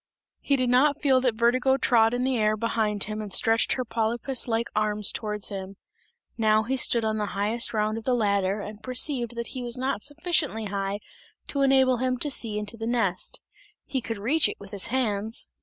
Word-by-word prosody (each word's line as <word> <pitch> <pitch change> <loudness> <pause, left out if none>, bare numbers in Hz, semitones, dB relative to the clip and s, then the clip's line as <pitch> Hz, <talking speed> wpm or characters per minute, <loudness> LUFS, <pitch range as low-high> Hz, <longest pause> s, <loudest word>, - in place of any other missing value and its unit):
He 280 - +1
did 255 -2 0
not 280 +3 +3
feel 265 -3 +3
that 250 -3 +1
Vertigo 250 +3 +2
trod 230 -3 +3
in 245 - -1
the 260 0 +1
air 215 -1 +1
behind 215 -2 0
him 215 +1 -4
and 210 -2 -7
stretched 225 +3 +3
her 255 - -3
polypus 230 +3 -1
like 230 0 0
arms 210 -1 +2
towards 210 -2 -2
him. 195 -1 -6 0.6
Now 215 -1 +3
he 260 +4 -1
stood 235 -3 +2
on 215 0 -1
the 210 - -1
highest 220 +4 0
round 215 0 -1
of - - -13
the 255 +1 +1
ladder 200 -2 0
and 210 +1 -8
perceived 255 -1 0
that 235 0 -4
he 255 - -5
was 240 0 -1
not 260 -3 -2
sufficiently 290 -5 -1
high 200 0 -3 0.5
to 280 - -1
enable 265 -2 +4
him 255 +1 0
to 290 +4 -2
see 225 -5 0
into 210 +2 -4
the 225 0 -4
nest; 225 -7 -1 0.4
he 270 -2 -2
could 225 -1 -5
reach 275 +11 +2
it - - -8
with 200 -1 -12
his 200 0 -1
hands. 220 -3 -1
230 Hz, 205 wpm, -26 LUFS, 210-255 Hz, 0.6 s, enable